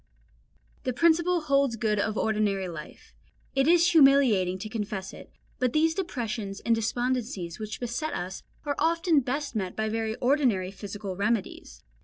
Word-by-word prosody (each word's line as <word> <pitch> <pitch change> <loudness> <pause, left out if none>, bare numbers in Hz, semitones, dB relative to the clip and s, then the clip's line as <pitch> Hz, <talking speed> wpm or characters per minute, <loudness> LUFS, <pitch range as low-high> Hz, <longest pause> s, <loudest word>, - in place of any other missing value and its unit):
The 255 - -2
principle 335 +4 +3
holds 275 -4 +2
good 215 -2 0
of 215 +1 -1
ordinary 210 -3 0
life; 165 -3 -10 0.4
it 270 +1 +2
is 345 +1 +5
humiliating 270 - +5
to 195 - -6
confess 210 -3 -4
it, - - -12 0.3
but 250 -1 +1
these 320 +1 +3
depressions 225 - -4
and 230 - +2
despondencies 225 -5 -2
which 215 0 -5
beset 245 +6 -3
us 180 +2 -5 0.2
are 290 - 0
often 330 -1 +3
best 275 +1 -3
met 190 -4 -2
by 220 0 -1
very 220 0 -2
ordinary 245 -9 +1
physical 200 -1 -6
remedies. 200 - -2
225 Hz, 150 wpm, -27 LUFS, 200-280 Hz, 0.4 s, is